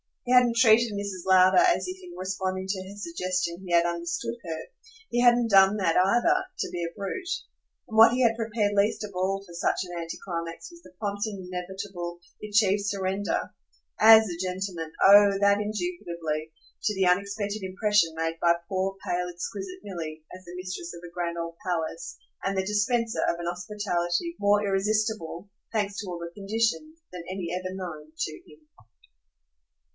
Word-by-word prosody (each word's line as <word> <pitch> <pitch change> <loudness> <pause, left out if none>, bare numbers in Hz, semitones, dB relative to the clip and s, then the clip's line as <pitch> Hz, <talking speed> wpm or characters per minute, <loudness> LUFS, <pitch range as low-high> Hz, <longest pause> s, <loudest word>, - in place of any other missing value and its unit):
He 250 - +1
hadn't 245 -2 +5
treated 230 -1 +5
Mrs. 200 -3 -5
Lowder 185 0 +6
as 360 0 +3
if 365 +1 -5
in 355 -1 -11
responding 190 0 -3
to 190 -1 -1
her 200 - -10
suggestion 185 - -3
he 175 - -3
had 170 0 +5
understood 170 +7 -2
her 165 -3 -4 0.5
he 240 - +1
hadn't 240 -1 +5
done 195 +1 +6
that 175 -5 +1
either 240 - +3
to - - -1
be 175 -1 -3
a 170 - -3
brute. 340 - -5 0.6
And 220 - -5
what 225 +1 +9
he 255 - +1
had 230 -2 +4
prepared 220 -2 -1
least 205 +1 +2
of 210 - -6
all 190 +2 -1
for 175 - -13
such 170 - 0
an 175 -2 -6
anti 165 0 -5
climax 170 - -5
was 340 0 -15
the 315 - -17
prompt 205 0 -2
and 200 -4 -6
inevitable, 180 -1 -6 0.2
the 215 - -7
achieved 205 -1 +3
surrender 205 - -1 0.5
AS 220 0 +8
a 175 - -5
gentleman, 180 -3 -4
oh 200 0 +8
that 200 0 +4
indubitably! 170 - -3 0.3
to 210 - +1
the 190 0 +2
unexpected 200 +3 0
impression 190 -3 +1
made 165 0 -2
by 170 0 +5 0.2
poor 190 0 -1
pale 180 0 -1
exquisite 200 - -6
Milly 160 -5 -6
as 185 0 -14
the 175 +1 -9
mistress 180 -2 -6
of 170 - -10
a 170 - -16
grand 170 -1 -3
old 170 0 -5
palace 165 -1 -3 0.3
and 195 0 -1
the 190 - 0
dispenser 225 +3 0
of 170 - +1
an 170 - -5
hospitality 180 - -2
more 205 +1 +3
irresistible, 200 -2 -1 0.2
thanks 205 -3 -1
to 205 - -5
all 175 - -4
the 170 0 -7
conditions, 225 - -1
than 180 -2 -7
any 185 -2 -4
ever 185 0 -3
known 155 -5 -7
to 155 - -2 0.2
him. 150 0 -19
195 Hz, 180 wpm, -27 LUFS, 175-215 Hz, 0.6 s, what